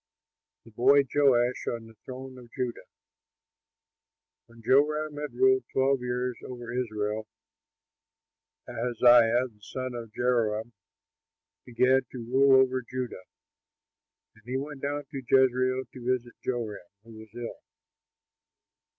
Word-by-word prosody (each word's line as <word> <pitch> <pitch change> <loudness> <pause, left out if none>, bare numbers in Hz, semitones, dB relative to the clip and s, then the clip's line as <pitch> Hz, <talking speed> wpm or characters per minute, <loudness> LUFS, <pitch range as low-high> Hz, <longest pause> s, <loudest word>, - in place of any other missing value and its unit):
THE 115 - -15
BOY 135 +6 +5
JOASH 125 -3 +2
ON 115 -1 -3
THE 115 - -15
THRONE 130 0 -8
OF 120 -1 -15
JUDAH 125 -2 -4 1.6
When 115 -1 -17
Joram 150 +4 +2
had 150 0 -5
ruled 390 0 +3
twelve 135 0 +2
years 125 0 -2
over 120 -2 -7
Israel, 110 -3 -2 1.4
Ahaziah 120 +1 +4
the 105 -4 -24
son 130 +4 -5
of 115 -2 -7
Jehoram 115 -1 0 0.9
began 125 +2 +3
to 120 -3 -6
rule 135 +2 +5
over 130 0 -2
Judah. 125 -6 -6 1.1
And 110 - -23
he 125 +2 -2
went 145 0 -6
down 145 +1 -2
to 135 -3 -5
Jezreel 130 0 +3
to 125 0 0
visit 120 -1 -16
Joram, 115 -5 -3 0.2
who 115 -1 -13
was 110 0 -12
ill. 120 -1 -6
125 Hz, 120 wpm, -28 LUFS, 115-130 Hz, 1.6 s, BOY